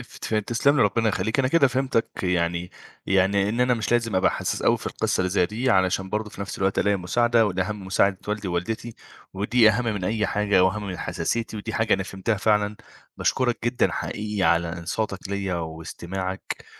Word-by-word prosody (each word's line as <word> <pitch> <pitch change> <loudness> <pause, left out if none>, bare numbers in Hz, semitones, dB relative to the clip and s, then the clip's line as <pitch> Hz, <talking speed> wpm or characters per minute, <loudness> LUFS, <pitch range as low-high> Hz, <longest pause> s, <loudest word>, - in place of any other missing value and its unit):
افت 120 -2 -6
تسلَم 120 +7 +2
لي، - - +4
ربنا 110 +2 +2
يخلّيك. 110 +5 -1
أنا 130 -1 +3
كده 150 0 +5
فهمتك 130 -2 0
يعني 90 -1 0 0.4
يعني 95 +1 +2
إن 115 +4 -1
أنا 125 0 +3
مش 115 0 -2
لازم 115 -4 +1
أبقى 95 - +3
حسّاس - - -3
أوي - - +3
في - - -8
القصة - - -1
اللي 90 0 0
زي 90 -2 +2
دي 115 +7 -1
علشان 95 -2 +2
برضو 105 0 -2
في - - -11
نَفْس 100 -2 -5
الوقت 95 0 +1
ألاقي 100 0 +2
مساعدة، 115 +5 +2
والأهم 100 +1 -2
مساعدة 95 0 +2
والدي 105 -2 -2
ووالدتي، 110 +6 -3 0.4
ودي 110 +4 +4
أهم 120 +3 -1
من 105 -5 -2
أي 105 +1 0
حاجة 100 -3 +2
وأهم 100 +2 0
من 90 -2 -5
حساسيتي، 115 -1 -2
ودي 110 +1 -5
حاجة 110 -1 +2
أنا - - -2
فهمتها 95 +3 -2
فعلًا. 105 0 +1 0.4
باشكرك 125 -2 +1
جدًا 120 +1 +1
حقيقي 105 -1 -3
على 85 -1 +2
إنصاتك 95 +3 -3
ليّا 100 -2 -2
واستماعك 85 +3 -5
105 Hz, 190 wpm, -24 LUFS, 95-115 Hz, 0.4 s, كده